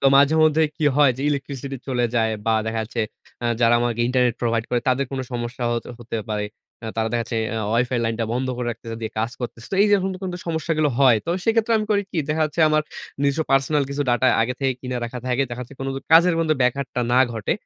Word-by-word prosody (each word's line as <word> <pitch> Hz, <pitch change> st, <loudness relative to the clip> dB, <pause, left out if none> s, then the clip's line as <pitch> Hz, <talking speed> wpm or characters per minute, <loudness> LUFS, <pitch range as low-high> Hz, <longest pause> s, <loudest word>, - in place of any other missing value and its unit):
তো -, -, -6 dB
মাঝেমধ্যে 155 Hz, +2 st, +4 dB
কী 155 Hz, -, -1 dB
হয়? 145 Hz, -3 st, +6 dB
যে 135 Hz, -, -5 dB
ইলেকট্রিসিটি 140 Hz, -1 st, -3 dB
চলে 125 Hz, -2 st, +1 dB
যায় 110 Hz, -1 st, +2 dB, 0.2 s
বা, 110 Hz, -, +3 dB
দেখা 110 Hz, 0 st, -1 dB
যাচ্ছে 115 Hz, +1 st, -4 dB, 0.4 s
আ -, -, +2 dB
যারা 115 Hz, 0 st, +5 dB
আমাকে 120 Hz, -1 st, -1 dB
ইন্টারনেট 125 Hz, -2 st, +2 dB
প্রোভাইড 115 Hz, -1 st, 0 dB
করে, 120 Hz, -1 st, +1 dB
তাদের 130 Hz, +2 st, +2 dB
কোন 135 Hz, -1 st, -3 dB
সমস্যা 120 Hz, +1 st, -4 dB
হ -, -, +1 dB, 0.3 s
হতে 115 Hz, -1 st, -5 dB
পারে। 105 Hz, -1 st, -1 dB, 0.4 s
আ -, -, -4 dB
তারা 110 Hz, 0 st, +1 dB
দেখা 120 Hz, -1 st, +1 dB
যাচ্ছে 115 Hz, -, -4 dB, 0.2 s
অ -, -, -2 dB
ওয়াইফাই 120 Hz, +2 st, +1 dB
লাইনটা 115 Hz, 0 st, -1 dB
বন্ধ 130 Hz, +2 st, -1 dB
করে 125 Hz, -1 st, -3 dB
রাখতেছে। 115 Hz, 0 st, -7 dB
দিয়ে 110 Hz, -, -4 dB
কাজ 115 Hz, +2 st, 0 dB
করতেছে। 115 Hz, -1 st, -6 dB
তো -, -, +1 dB
এইযে 205 Hz, -1 st, +5 dB
এখন 190 Hz, +1 st, -1 dB, 0.2 s
যে -, -, -6 dB
সমস্যাগুলো 160 Hz, -1 st, 0 dB
হয়, 130 Hz, -5 st, +6 dB
তো -, -, 0 dB
সেক্ষেত্রে 225 Hz, 0 st, +2 dB
আমি 215 Hz, -, -2 dB
করি 205 Hz, -1 st, +3 dB
কি? 170 Hz, -, -3 dB
দেখা 155 Hz, +1 st, +1 dB
যাচ্ছে 155 Hz, +2 st, -4 dB
আমার 155 Hz, 0 st, +2 dB, 0.4 s
নিজস্ব 140 Hz, +3 st, +1 dB
পার্সোনাল 135 Hz, +2 st, +3 dB
কিছু 145 Hz, +1 st, -1 dB
ডাটা 120 Hz, +2 st, +2 dB, 0.2 s
আগে 125 Hz, +2 st, -1 dB
থেকেই 135 Hz, -1 st, +1 dB
কিনে 125 Hz, -1 st, -4 dB
রাখা 125 Hz, +2 st, -5 dB
থাকে। 125 Hz, +2 st, +1 dB
দেখা 120 Hz, +1 st, -5 dB
যাচ্ছে 130 Hz, +3 st, -12 dB
কোনো 135 Hz, 0 st, -2 dB
ক -, -, -3 dB
কাজের 170 Hz, +1 st, +7 dB
মধ্যে 155 Hz, -1 st, +2 dB
ব্যাঘাতটা 125 Hz, 0 st, 0 dB
না 125 Hz, -, +5 dB
ঘটে। 110 Hz, -3 st, -1 dB
130 Hz, 230 wpm, -22 LUFS, 120-150 Hz, 0.4 s, কাজের